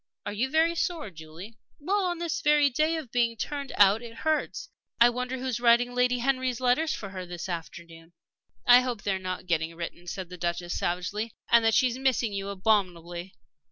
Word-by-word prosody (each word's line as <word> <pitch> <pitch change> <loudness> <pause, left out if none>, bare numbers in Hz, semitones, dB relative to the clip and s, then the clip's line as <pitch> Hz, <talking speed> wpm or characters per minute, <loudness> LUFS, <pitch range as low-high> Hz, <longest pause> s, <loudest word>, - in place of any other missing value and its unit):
"Are - - -3
you 240 +6 -1
very 320 +3 +3
sore, 335 - -2
Julie?" 165 +7 -11 0.2
"Well, 385 +6 0
on 350 -1 -1
this 340 -2 -3
very 295 -1 +4
day 310 +5 +1
of 285 -8 -7
being 235 -2 +1
turned 280 +2 -4
out 205 +2 +5
it 230 -1 -10
hurts. 310 +5 -1 0.3
I 240 +1 +7
wonder 250 +1 -3
who 260 - -6
is 250 -3 -1
writing 240 +1 +4
Lady 250 0 +2
Henry's 255 -1 0
letters 260 +6 +2
for 200 - -5
her 185 -1 -6
this 175 0 -7
afternoon?" 170 -1 -8 0.5
"I 245 +1 +8
hope 245 -4 -4
they 200 - 0
are 190 - -2
not 185 -1 -5
getting 165 -1 -1
written," 175 +1 -7
said 185 0 -5
the 180 - -9
Duchess, 175 0 -2
savagely; 200 +6 -2 0.2
"and 235 -1 +6
that 225 0 +3
she's 255 -2 +2
missing 250 -5 +1
you 195 0 -3
abominably. 185 -3 -1
230 Hz, 195 wpm, -27 LUFS, 185-260 Hz, 0.5 s, I